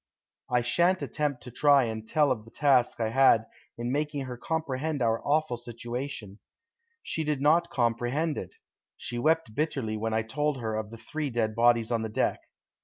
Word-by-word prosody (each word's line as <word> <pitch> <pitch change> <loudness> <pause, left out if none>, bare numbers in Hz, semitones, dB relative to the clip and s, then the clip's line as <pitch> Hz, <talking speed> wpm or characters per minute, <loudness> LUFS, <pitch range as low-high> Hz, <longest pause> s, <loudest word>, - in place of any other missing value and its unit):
I 125 -1 +2
shan't 175 +10 +2
attempt 145 -4 -2
to 125 - -9
try 140 +2 +5
and 110 -1 -4
tell 150 +2 +3
of 115 -4 -1
the 115 - -15
task 130 -3 +2
I 110 -1 0
had 115 -2 +5 0.3
in 120 +1 -3
making 145 -1 -1
her 125 -1 -6
comprehend 155 +1 -2
our 115 -2 +1
awful 145 -4 +1
situation. 120 -2 -6 0.6
She 160 - -2
did 150 -2 -1
not 160 +4 +3
comprehend 120 +6 0
it. 95 -7 -7 0.4
She 120 -1 -5
wept 160 -3 +1
bitterly 135 -6 -1
when 110 +1 -1
I 110 - +1
told 145 +5 -1
her 110 -2 -2
of 110 -1 -3
the 115 - -10
three 145 +6 -4
dead 115 -3 0
bodies 115 0 +3
on 115 -1 +1
the 110 - -3
deck. 105 - 0
125 Hz, 180 wpm, -28 LUFS, 115-150 Hz, 0.6 s, try